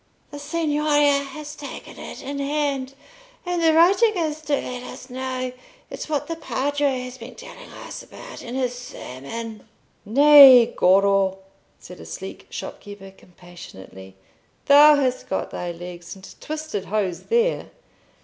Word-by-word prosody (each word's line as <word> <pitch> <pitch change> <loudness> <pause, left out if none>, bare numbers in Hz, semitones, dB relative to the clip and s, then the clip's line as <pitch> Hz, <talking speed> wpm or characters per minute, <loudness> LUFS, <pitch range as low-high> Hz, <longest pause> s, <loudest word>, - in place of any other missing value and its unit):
"The 290 - -8
Signoria 295 -1 +1
has 295 +1 -8
taken 290 - -10
it - - -9
in 280 +1 -5
hand, 280 -2 -2 0.5
and 355 -1 -2
the 325 -1 +4
writing 380 +7 +4
is 310 -2 -2
to 300 -1 -3
let 250 -2 -5
us 250 +1 -11
know. 255 0 -4 0.4
It's - - -7
what 295 -3 -1
the 330 - -5
Padre 285 -3 -1
has 250 0 -9
been 235 +2 -10
telling - - -12
us - - -9
about - - -11
in 240 +1 -7
his 255 -2 -1
sermon." 225 - -8 0.4
"Nay, 270 0 +8
Goro," 195 0 +3 0.4
said - - -12
a - - -11
sleek - - -8
shopkeeper, 205 -1 -9
compassionately, 170 - -14 0.5
"thou 295 +1 +8
hast 260 -3 -1
got 190 - -3
thy 175 -1 -4
legs 175 +1 -9
into 190 0 -13
twisted 310 -10 -5
hose 195 -4 -2
there. 470 +2 0
265 Hz, 140 wpm, -22 LUFS, 205-300 Hz, 0.5 s, Nay